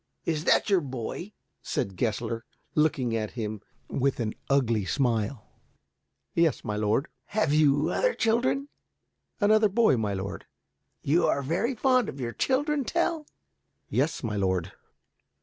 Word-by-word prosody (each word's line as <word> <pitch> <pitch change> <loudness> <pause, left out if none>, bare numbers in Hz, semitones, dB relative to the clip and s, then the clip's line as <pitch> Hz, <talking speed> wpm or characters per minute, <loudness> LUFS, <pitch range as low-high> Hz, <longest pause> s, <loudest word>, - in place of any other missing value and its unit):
"Is 160 -1 -1
that - - +4
your 195 -4 +3
boy?" 135 - -5 0.3
said 95 - -2
Gessler, 115 +2 -2 0.3
looking 135 -6 +1
at 110 -2 -2
him 110 -2 -3 0.3
with 135 0 0
an 110 -2 -1 0.2
ugly 120 -6 +2
smile. 115 +1 0 0.9
"Yes, 165 -2 +2
my 105 -2 -3
lord." 105 +7 +1 0.2
"Have 200 -9 0
you 150 0 +4
other - - +1
children?" 245 +5 +1 0.7
"Another 215 0 +4
boy, 215 - +4
my 105 -3 -1
lord." 95 0 -5 0.6
"You 165 +5 +3
are 140 - +1
very 180 - 0
fond 255 -1 +3
of 140 - -8
your 120 -2 -3
children, 290 +2 +1
Tell?" 330 +1 -1 0.6
"Yes, 135 +9 0
my 110 -3 -2
lord." 95 -2 0
140 Hz, 135 wpm, -27 LUFS, -, 0.9 s, that